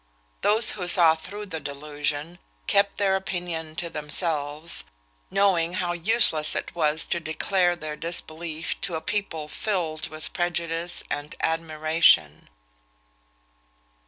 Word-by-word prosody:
Those 215 +2 +3
who 180 -4 -5
saw 170 -2 +6
through 200 +6 -7
the 165 -5 -5
delusion 150 +3 -4 0.3
kept 200 0 +2
their 195 -2 +2
opinion 175 -4 -4
to 175 0 -3
themselves, 150 - 0 0.4
knowing 190 -4 +2
how 180 -1 -1
useless 175 -4 +3
it - - -3
was 155 -1 +1
to 170 - -1
declare 175 +3 +1
their 155 -3 -6
disbelief 165 0 -2
to 180 -3 -1
a - - -1
people 160 -3 -3
filled 160 -4 -2
with 155 0 -7
prejudice 170 -1 -2
and 145 +1 -4
admiration." 155 - +3
165 Hz, 120 wpm, -25 LUFS, 155-180 Hz, 0.4 s, saw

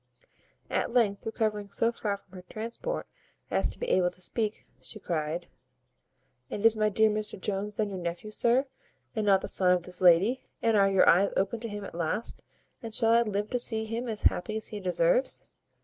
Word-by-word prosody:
At - - 0
length, 225 -4 +1
recovering 210 -2 -1
so 230 +3 +1
far 205 -3 -3
from 195 -1 -30
her 180 - -8
transport 235 - -4 0.5
as - - +1
to - - -7
be 485 - -3
able 180 -1 +3
to 180 - -13
speak, 215 +3 -2 0.2
she 215 - -7
cried, 165 -1 -3 1.0
"And 210 - -3
is 225 0 +8
my 215 -1 +2
dear 220 +2 +4
Mr 210 -1 -2
Jones 205 +2 -3
then 215 -1 0
your 190 - -4
nephew, 175 +5 -5
sir, 240 +5 +2 0.5
and 215 -1 -1
not 195 -1 +5
the - - -4
son 180 -1 +3
of 180 -2 0
this 180 +1 -5
lady? 185 +8 +5 0.2
And 225 -1 +2
are 195 -1 +5
your 195 -1 +4
eyes 190 +4 +5
opened 200 +4 0
to 230 - -4
him 205 -1 -6
at - - -9
last? 170 +6 -2 0.4
And 225 -2 -4
shall 225 0 +3
I 235 - +6
live 210 -2 -2
to 250 - +1
see 220 -2 +1
him 230 +3 -4
as 220 -2 -4
happy 215 +4 +1
as 220 - -2
he 210 - -5
deserves?" - - +1
210 Hz, 205 wpm, -28 LUFS, 190-225 Hz, 1.0 s, is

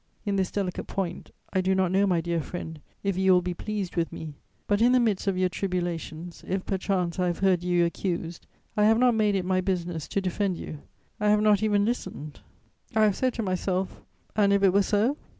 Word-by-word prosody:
In 200 -1 0
this 190 -2 +1
delicate 190 -3 -3
point, 180 -3 -4 0.2
I 185 - +2
do 190 +1 +1
not 190 -2 +2
know, 195 +2 +3
my 175 -3 +2
dear 170 0 -1
friend, 160 -1 -7 0.2
if 195 -2 0
you 190 0 +4
will 180 -1 +4
be 180 0 -2
pleased 205 0 -4
with 170 -1 0
me; 155 -2 -7 0.3
but, 205 +1 +1
in 245 +2 +5
the 255 - +5
midst 215 -5 0
of 195 -2 +1
your 185 0 +3
tribulations, 175 -3 -4
if 190 0 -2
perchance 190 -2 -1
I 180 - +2
have 175 - -1
heard 190 -3 +2
you 175 -1 +3
accused, 170 -1 -3 0.3
I 210 - +3
have 220 +1 +5
not 250 0 +4
made 210 -2 +2
it 185 -2 -1
my 185 0 +1
business 175 -4 -2
to - - -1
defend 190 0 -1
you: 155 - -7 0.4
I 210 -1 +2
have 210 0 +4
not 210 -1 +4
even 205 -2 +2
listened. 155 -10 -4 0.6
I 220 - +5
have 210 -3 +3
said 255 -2 0
to 230 - -2
myself, 185 0 -2 0.3
'And 205 -2 +4
if 200 0 +3
it 190 -2 +5
were 200 - +5
so?' 215 +8 +1
190 Hz, 220 wpm, -27 LUFS, 175-205 Hz, 0.6 s, in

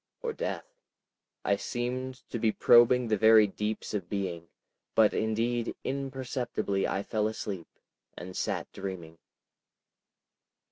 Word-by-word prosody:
Or 470 -2 -1
Death?... - - -3 0.8
I - - +3
seemed 125 +1 -4
to 120 - -2
be 110 -1 +3
probing 120 +2 +5
the 110 -1 +2
very 110 +1 +7
deeps 105 +2 -3
of 95 -5 -3
being, 90 -5 -3 0.5
but 110 -2 +5
indeed 115 +2 0
imperceptibly 130 -7 -2
I 100 - -1
fell 105 0 0
asleep, 100 -5 -5 0.5
and 90 +1 -8
sat - - -2
dreaming. 85 -4 -7
110 Hz, 120 wpm, -29 LUFS, 100-120 Hz, 0.8 s, very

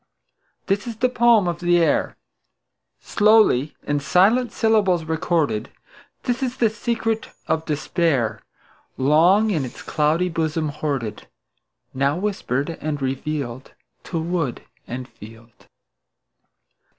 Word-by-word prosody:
This 200 +3 -1
is 230 - -5
the 250 +3 +1
poem 235 -5 +4
of 170 -1 -2
the 175 0 +3
air, 170 - +1 0.8
Slowly 210 - +3
in 145 0 -1
silent 210 - +3
syllables 205 -7 +2
recorded; 160 -7 -1 0.5
This 245 0 -1
is 255 -1 -2
the 230 -3 +2
secret 225 0 -2 0.2
of 160 0 -1
despair, 145 - 0 0.6
Long 170 +10 +4
in 160 -8 0
its 125 - -8
cloudy 155 +4 +1
bosom 160 -2 -1
hoarded, 140 -7 -4 0.7
Now 140 +3 +1
whispered 170 - -2
and 150 -1 -2
revealed 135 -1 -4 0.3
To 165 - -3
wood 165 -6 -2 0.2
and 125 +1 -6
field. 115 0 -15
160 Hz, 115 wpm, -22 LUFS, 140-210 Hz, 0.8 s, poem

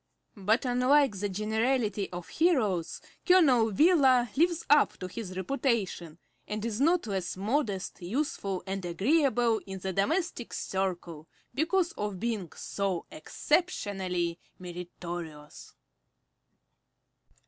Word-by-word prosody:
But 215 +5 +1
unlike 255 -1 +3
the 205 +1 -1
generality 215 +1 0
of 175 -1 -7
heroes, 220 - +1 0.2
Colonel 275 - +5
Wheeler 265 - +4
lives 335 +2 +2
up 290 0 +4
to 185 - -5
his 185 -1 -7
reputation, 190 - -1 0.3
and 210 +1 -3
is 230 +1 -2
not 335 +4 +3
less 190 -4 -3
modest, 205 -3 -2
useful, 195 -3 -2
and 195 0 -4
agreeable 240 - +2
in 190 0 -5
the 190 0 -4
domestic 295 - -1
circle 175 -4 -3 0.3
because 340 +6 +1
of 205 -3 -4
being 215 -6 -3
so 195 -4 -3
exceptionally 185 - -1 0.2
meritorious! 175 -3 -8
210 Hz, 105 wpm, -29 LUFS, 185-270 Hz, 0.3 s, Colonel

